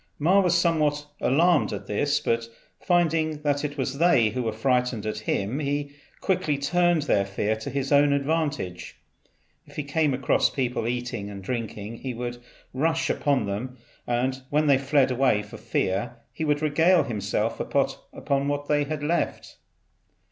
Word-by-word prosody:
Ma 180 Hz, +7 st, +4 dB
was 180 Hz, -2 st, +3 dB
somewhat 150 Hz, -4 st, +1 dB
alarmed 165 Hz, +4 st, +3 dB
at -, -, -5 dB
this, 145 Hz, +8 st, 0 dB
but 115 Hz, -5 st, -1 dB, 0.3 s
finding 160 Hz, -3 st, +1 dB
that 145 Hz, -1 st, 0 dB
it 145 Hz, 0 st, -4 dB
was 135 Hz, +1 st, -2 dB
they 135 Hz, -10 st, +4 dB
who 125 Hz, +4 st, -3 dB
were 115 Hz, -2 st, -1 dB
frightened 125 Hz, 0 st, 0 dB
at 110 Hz, -, -3 dB
him, 105 Hz, +8 st, -2 dB
he 145 Hz, 0 st, -2 dB, 0.3 s
quickly 185 Hz, -6 st, 0 dB
turned 175 Hz, +2 st, +2 dB
their 100 Hz, -9 st, +2 dB
fear 100 Hz, +2 st, -1 dB
to 110 Hz, +5 st, -6 dB
his 135 Hz, +1 st, -3 dB
own 145 Hz, 0 st, +5 dB
advantage. 140 Hz, -, -2 dB, 0.7 s
If -, -, -16 dB
he 150 Hz, -, -2 dB
came 150 Hz, +1 st, +1 dB
across 135 Hz, 0 st, +2 dB
people 125 Hz, -4 st, -2 dB
eating 120 Hz, -4 st, -3 dB
and 100 Hz, -1 st, -8 dB
drinking 115 Hz, -1 st, -4 dB
he 130 Hz, -1 st, -5 dB
would 120 Hz, 0 st, -4 dB, 0.4 s
rush 160 Hz, +5 st, +1 dB
upon 140 Hz, -7 st, +1 dB
them, 115 Hz, +6 st, -4 dB, 0.3 s
and 130 Hz, +2 st, 0 dB
when 150 Hz, +1 st, +2 dB
they 140 Hz, -3 st, +4 dB
fled 135 Hz, -1 st, +2 dB
away 125 Hz, -5 st, +2 dB
for 105 Hz, -, -11 dB
fear, 100 Hz, +6 st, -1 dB, 0.2 s
he 160 Hz, -, -3 dB
would 150 Hz, 0 st, +1 dB
regale 165 Hz, +4 st, +4 dB
himself 105 Hz, 0 st, -2 dB
upon 140 Hz, 0 st, -1 dB
what 145 Hz, 0 st, -2 dB
they 145 Hz, -1 st, +2 dB
had 150 Hz, 0 st, -4 dB
left. 170 Hz, +3 st, -2 dB
140 Hz, 160 wpm, -25 LUFS, 120-150 Hz, 0.7 s, own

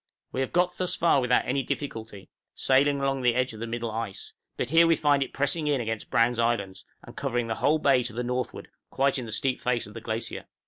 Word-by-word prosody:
} -, -, -59 dB
We 130 Hz, -, -1 dB
have 130 Hz, -, -2 dB
got 180 Hz, 0 st, +2 dB
thus 180 Hz, -1 st, +1 dB
far 165 Hz, -5 st, +3 dB
without 125 Hz, 0 st, +2 dB
any 135 Hz, +2 st, 0 dB
difficulty, 110 Hz, -7 st, -5 dB, 0.3 s
sailing 140 Hz, +2 st, +3 dB
along 135 Hz, -1 st, 0 dB
the 120 Hz, -2 st, +3 dB
edge 125 Hz, -1 st, 0 dB
of 110 Hz, -, -10 dB
the 115 Hz, -, -4 dB
middle 115 Hz, 0 st, -3 dB
ice; 110 Hz, -3 st, -5 dB, 0.2 s
but 125 Hz, -, -2 dB
here 165 Hz, +1 st, +6 dB
we 165 Hz, -, +5 dB
find 145 Hz, -2 st, +2 dB
it 135 Hz, -, -2 dB
pressing 145 Hz, +3 st, 0 dB
in 145 Hz, -2 st, +2 dB
against 110 Hz, -2 st, -4 dB
Browne's 115 Hz, +1 st, +2 dB
Islands, 115 Hz, -5 st, -1 dB, 0.2 s
and -, -, -13 dB
covering 120 Hz, 0 st, -1 dB
the 115 Hz, -, -2 dB
whole 155 Hz, +2 st, +4 dB
bay 140 Hz, -4 st, +3 dB
to 120 Hz, -2 st, -4 dB
the 120 Hz, +2 st, -3 dB
northward, 125 Hz, +1 st, -3 dB, 0.2 s
quite 135 Hz, 0 st, +1 dB
in 120 Hz, -, -6 dB
the -, -, -7 dB
steep 130 Hz, +4 st, -1 dB
face 125 Hz, -1 st, 0 dB
of 105 Hz, -, -12 dB
the 115 Hz, -, -8 dB
glacier. 110 Hz, +1 st, -4 dB
125 Hz, 240 wpm, -27 LUFS, 115-140 Hz, 0.3 s, here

